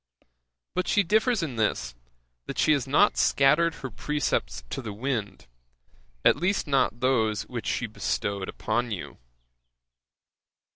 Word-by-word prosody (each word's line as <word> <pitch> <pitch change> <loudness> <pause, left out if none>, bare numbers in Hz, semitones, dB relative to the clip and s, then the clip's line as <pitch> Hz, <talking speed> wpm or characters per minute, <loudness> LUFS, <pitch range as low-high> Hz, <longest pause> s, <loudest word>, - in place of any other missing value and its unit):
But 185 - -1
she 205 - +3
differs 215 +2 +2
in 135 -7 -4
this, 85 - 0 0.5
that - - -5
she - - +3
has 140 -4 +1
not 150 +10 +4
scattered 150 +5 +3
her 130 - -4
precepts 110 - -2
in - - -4
the 110 - -5
wind, 110 -3 -3 0.8
at - - +6
least 190 +3 0
not 135 -4 +1
those 110 -5 +2
which - - -6
she - - -1
bestowed 95 +11 -3
upon 120 +2 -1
you. 100 -6 -6
130 Hz, 135 wpm, -26 LUFS, 110-155 Hz, 0.8 s, at